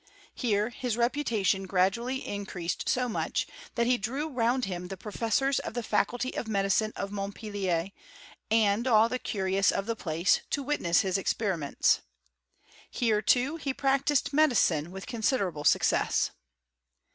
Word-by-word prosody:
Here 215 -2 0
his 245 -2 -3
reputation 235 -7 0
gradually 235 +8 +1
increaaed. 190 -4 -4
so 255 -1 +1
much, 225 - -1 0.3
that 235 - +2
he 245 0 +2
drew 270 +9 -2
round 250 -1 +1
him 180 -1 -5
the 195 +1 -7
professors 230 +7 0
of - - -6
the' 240 - -2
faculty 245 +4 -1
of 230 - -3
medicine 200 +1 +1
of 195 - -4
Montpelier, 200 -3 -3 0.6
sind 220 +1 +3
all 225 -2 +5
the 255 - -2
curious 195 -3 +1
of 195 - 0
the 230 +1 -2
place, 170 -2 +1
to 280 - -1
witness 250 -12 +2
his 190 0 0
experiments. 185 -7 +1 0.9
Here, 220 -4 +1
tooV 255 +8 +2
he 275 -2 -2
practised 275 +1 +1
medicine 230 - +3
with 190 +1 -8
considerable 205 - -1
success. - - +2
220 Hz, 140 wpm, -28 LUFS, 195-250 Hz, 0.9 s, all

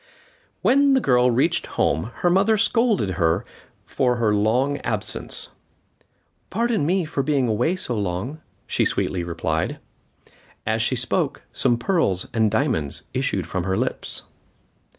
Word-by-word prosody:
When 280 +1 +4
the 265 - +4
girl 125 - +3
reached 130 +8 +1
home 80 +9 +1
her 175 - +4
mother 200 +4 +3
scolded 225 - +2
her 80 -1 +2 0.4
for 125 -3 +1
her 115 -3 +1
long 125 +7 +1
absence. 105 -5 -3 1.0
"Pardon 225 -7 0
me 185 0 +1
for 150 -2 -2
being 135 -2 +1
away 120 - +1
so 125 -10 -2
long," 105 - -3 0.2
she - - 0
sweetly 90 -2 -1
replied. 80 -1 -2 0.9
As - - 0
she - - +1
spoke - - -1
some 120 - +3
pearls 120 - 0
and 110 -2 +3
diamonds 105 - -1
issued 125 - -1
from 90 +2 -3
her 95 0 0
lips. - - 0
125 Hz, 135 wpm, -23 LUFS, -, 1.0 s, When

